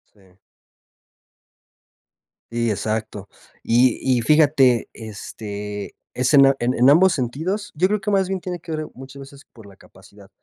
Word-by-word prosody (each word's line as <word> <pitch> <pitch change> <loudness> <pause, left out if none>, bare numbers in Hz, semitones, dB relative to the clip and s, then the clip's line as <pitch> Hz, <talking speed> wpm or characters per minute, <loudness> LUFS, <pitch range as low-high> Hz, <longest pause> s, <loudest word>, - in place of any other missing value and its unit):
Sí. 95 -3 -24 2.2
Sí, 115 -1 0
exacto. 105 -1 -4 0.3
Y 120 +1 +3 0.2
y - - -2
fíjate, 140 -5 +3
este, 105 -1 -8 0.2
es 130 +3 0
en 140 -1 +7
en 125 +2 0
en 125 +3 +4
ambos 175 +6 +5
sentidos, 160 - -3
yo 180 +5 +2
creo 210 0 -1
que 205 +2 -2
más 195 -2 +2
bien 190 -1 -3
tiene 180 -1 -5
que 160 0 -8
ver 155 0 -4
muchas 135 +2 -12
veces 135 +1 -14
por 110 -3 -15
la 95 -1 -17
capacidad. 100 +1 -19
130 Hz, 150 wpm, -21 LUFS, 110-155 Hz, 2.2 s, en